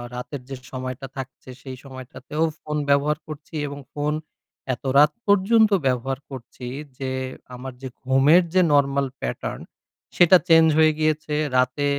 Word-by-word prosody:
রাতের 125 +2 -6
যে 135 - -5 0.2
সময়টা 130 +1 -5
থাকছে, 130 -1 -8
সেই 130 -1 -8
সময়টাতেও 135 +3 -5 0.2
ফোন 150 0 -4
ব্যবহার 145 +2 +3
করছি। 155 +1 -9
এবং 140 0 -7
ফোন 150 +1 -1 0.6
এত 120 - -9
রাত 150 +1 +7 0.2
পর্যন্ত 210 +2 +4 0.2
ব্যবহার 130 +1 -1
করছি 130 -1 -9 0.3
যে, 135 -1 -3 0.4
আমার 130 +1 -7
যে 135 - -5 0.2
ঘুমের 135 +7 +5
যে 185 - +5
নরমাল 140 -1 +2
প্যাটার্ন, 60 - -4 0.5
সেটা 175 +1 +7
চেঞ্জ 165 -1 +6
হয়ে 155 0 +5
গিয়েছে। 155 -1 0 0.2
রাতে 130 +3 +1
140 Hz, 140 wpm, -23 LUFS, 130-155 Hz, 0.6 s, রাত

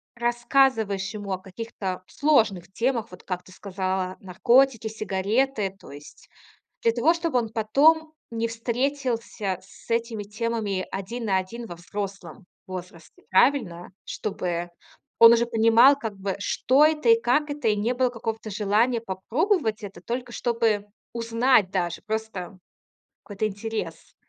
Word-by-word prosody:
рассказываешь 235 -4 +1
ему 205 -2 -6
о 185 - -1
каких-то 190 -1 -6
сложных 215 - +1
темах, 235 +1 -1
вот 180 - -12
как 180 -1 -4
ты - - -17
сказала 185 -1 -3
наркотики, 235 +5 +3
сигареты, 215 +1 -1
то - - -13
есть 145 +1 -13 0.5
для 230 - +4
того 260 +8 +3
чтобы 335 -6 0
он 225 -2 -3
потом 300 +9 +3 0.2
не 230 0 -1
встретился 230 -4 -2
с 195 +4 -18
этими 230 -2 -1
темами 210 -2 -2
один 225 +5 -5
на 195 -3 +2
один 230 +6 -5
во 175 - -7
взрослом 195 0 -7 0.2
возрасте, 180 -3 -9
правильно? 190 -6 +2
Чтобы 175 -4 -3 0.5
он 230 0 +10
уже 235 0 +3
понимал 230 +5 +6
как 215 -3 -5
бы 195 0 -3
что 265 +8 +3
это 310 +7 +2
и 460 0 +6
как 300 0 +2
это 290 -4 -3
и 210 - +2
не 220 +4 0
было 250 0 +2
какого-то 225 -2 -5
желания 215 +4 +1
попробовать 225 - -1
это 195 -1 -9
только 245 +1 -4
чтобы 230 -4 0 0.3
узнать 230 -2 +2
даже 175 -3 -2
просто 215 -4 -4 0.7
какой-то 205 +1 -2
интерес. 215 +2 -6
220 Hz, 140 wpm, -25 LUFS, 195-240 Hz, 0.7 s, он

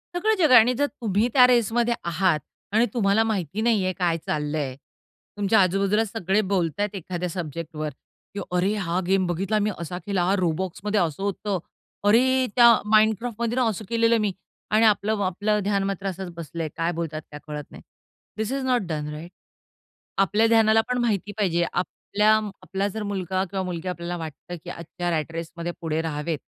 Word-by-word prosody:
सगळं 435 +5 +2
जग 315 -7 +3
आहे 250 - +10
आणि 245 +3 +4
जर 285 +4 +1
तुम्ही 220 -5 0
त्या 255 -2 +8
रेसमध्ये 240 0 +2
आहात 170 -1 +1 0.3
आणि 225 +2 +4
तुम्हाला 215 -1 +3
माहिती 205 -2 -2
नाही 225 -4 +2
आहे 185 - 0
काय 175 -3 0
चाललंय, 150 -3 -2 0.6
तुमच्या 205 +2 +3
आजूबाजूला 195 +4 +2
सगळे 200 -1 0
बोलत 175 -2 0
आहेत 205 0 -1
एखाद्या 180 -1 -4
सब्जेक्टवर, 160 -2 -5 0.5
की - - -3 0.2
"अरे! 190 +4 +2
हा 180 -3 -1
गेम 190 0 +3
बघितला 190 +5 0
मी, 210 0 +1
असा 170 +1 -5
केलं. 200 -3 0
हा 180 +2 +2
Robloxमध्ये 185 +4 -1
असं 170 +2 -1
होतं. 200 -1 -2 0.5
अरे! 255 +4 +4
त्या 240 -1 +8 0.3
Minecraftमध्ये 225 +2 +2
ना 255 -1 +2
असं 215 0 -5
केलेलं 230 0 +3
मी." 210 -2 +1 0.4
आणि 220 +2 +5
आपलं 215 0 +3
म - - -3
आपलं 205 +3 0
ध्यान 200 0 +1
मात्र 195 0 -3
असच 190 -1 -4
बसलंय, 165 0 -5
काय 165 +1 0
बोलत 165 -2 -4
आहेत 155 0 -5
त्या 150 - -9
कळत 150 -1 -5
नाही. - - -11 0.6
दिस 220 +2 -2
इज 275 -1 -2
नॉट 250 -1 +2
डन, 150 -2 -3
राइट? 160 +3 -8 0.9
आपल्या 215 +3 +3
ध्यानाला 225 -1 +5
पण 250 0 0
माहिती 205 -4 0
पाहिजे 175 -4 +2
आपल्या 205 +4 0 0.3
आपला 195 +1 -2
जर 215 +2 -5
मुलगा 190 -2 -2
किंवा 190 -1 -2
मुलगी 180 -1 -4
आपल्याला 175 -1 -4
वाटतं 165 +1 -7
की 175 - -7
आजच्या 175 +1 -5
रॅट 155 -1 -1
रेसमध्ये 170 +1 -5
पुढे 160 -1 -1
राहावेत, 155 0 -3
195 Hz, 180 wpm, -24 LUFS, 170-220 Hz, 0.9 s, आहे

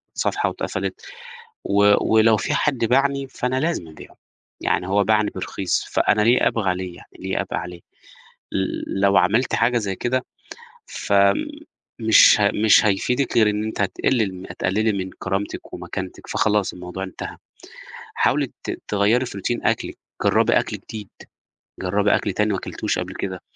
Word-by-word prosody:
صفحة - - 0
واتقفلت، - - -4 0.6
و 100 0 +4 0.2
ولو 110 0 +5
في - - -2
حد 145 -3 +1
باعني 135 +2 +1
فأنا 130 0 -2
لازم 160 - -1
أبيعه، 80 - -14 0.4
يعني 90 - 0
هو 100 +1 +2
باعني 105 0 +2
برخيص، 95 -2 -2
فأنا 105 - +2
ليه 120 +4 +4
أبقى 105 -5 0
عليه 90 -1 -3
يعني، - - -16
ليه 95 +1 -2
أبقى 100 - -4
عليه، 90 -1 -8 1.1
لو 100 0 +2
عملتِ 110 +8 +2
حاجة 120 +1 +2
زي 100 -4 -3
كده، 130 +1 -1 0.6
فمش 110 - +2
ه 100 -1 +4
مش 110 +1 +5
هيفيدِك 125 +7 0
غير 110 -2 +5
إن 105 +1 -2
أنتِ 110 -1 -4
هتقلل 105 0 0
م 90 +1 -9
هتقللي 110 +4 0
من 95 -2 -3
كرامتِك 95 +1 -4
ومكانتِك - - -7
فخلاص 105 -2 +1
الموضوع 90 +1 -6
انتهى، 95 - -7 0.8
حاولي - - +2 0.2
ت - - -4
تغيّري 105 +5 +2
في 100 - -7
routine 120 +5 -2
أكلِك، - - -2 0.3
جرّبي - - +3
أكل - - -5
جديد، 105 -3 -9 0.7
جرّبي 100 +3 +2
أكل 100 - -1
تاني 105 0 +1
ما 95 - -1
كلتيهوش - - -3
قبل - - -5
كده، - - -5
105 Hz, 150 wpm, -22 LUFS, 95-115 Hz, 1.1 s, ولو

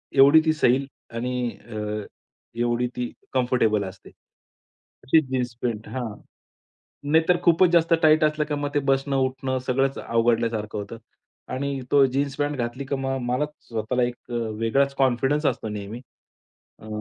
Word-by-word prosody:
एवढी 140 +3 +8
ती 160 - +3
सैल 135 -3 +2 0.3
आणि 125 +1 -1 0.2
अ, 105 -2 -4 0.6
एवढी 120 +1 +1
ती 125 -1 -3 0.2
कम्फर्टेबल 120 -5 +2
असते. 95 0 -9 1.0
अशी 160 +4 +5
जीन्स 125 -2 -1
पॅन्ट 115 -3 -2
हां. 120 -5 -4 1.0
नाहीतर 160 +3 +4
खूपच 170 +1 +5
जास्त 170 -1 +4
टाईट 155 0 +5
असलं 150 0 +1
की 150 - -4
मग 145 0 -2
ते 145 - +3
बसणं-उठणं 135 -1 0
सगळंच 135 +2 +1
अवघडल्यासारखं 115 -2 0
होतं. 105 +2 -6 0.6
आणि 140 +1 -2
तो 140 -1 +6
जीन्स 135 +1 -1
पॅन्ट 145 0 -1
घातली, 120 +3 -3
की 140 - -2
मग 135 0 -2
मलाच 145 +5 0 0.2
स्वतःला 115 +2 -1
एक 120 0 -1 0.2
अ, - - -4
वेगळाच 115 +4 0
कॉन्फिडन्स 135 +3 +1
असतो 110 - 0
नेहमी. 105 +2 -6 0.8
अ, 110 - -11
130 Hz, 145 wpm, -24 LUFS, 115-140 Hz, 1.0 s, एवढी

